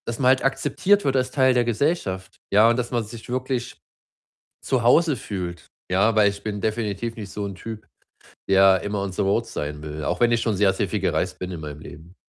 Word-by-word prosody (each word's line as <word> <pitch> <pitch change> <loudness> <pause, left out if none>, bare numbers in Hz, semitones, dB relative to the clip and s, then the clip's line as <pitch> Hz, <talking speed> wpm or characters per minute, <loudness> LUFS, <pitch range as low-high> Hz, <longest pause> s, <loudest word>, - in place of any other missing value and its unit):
Dass 115 - -3
man 130 -2 +4
halt 130 0 +3
akzeptiert 195 +8 +2
wird, 135 -1 +1
als 130 -1 +1
Teil 130 -2 +3
der 125 -1 +3
Gesellschaft, 105 - -1
ja, 110 +3 +6
und 120 - +2
dass 120 -1 -2
man 120 -2 0
sich 110 +2 -11
wirklich, 130 -1 -3 0.9
zu 130 -2 +1
Hause 145 +5 +4
fühlt, 90 -6 -6 0.2
ja? 100 +4 +3
Weil 105 -2 +5
ich 100 0 -7
bin 105 -1 -4
definitiv 110 +1 -2
nicht 105 -3 -7
so 105 - -5
'n 100 -1 -6
Typ, 110 +3 -8 0.6
der 95 -1 +5
immer 100 0 -2
on 100 -1 -4
the - - -1
road 100 +4 +1
sein 75 -7 -5
will, 75 0 -6
auch 90 - -1
wenn 120 0 +4
ich 115 - +2
schon 110 -3 0
sehr, 95 0 +3
sehr 95 - -2
viel - - -1
gereist - - -1
bin, 90 0 -5
in 85 - -6
meinem 75 -1 -7
Leben. 80 +4 -12
110 Hz, 225 wpm, -23 LUFS, 95-120 Hz, 0.9 s, ja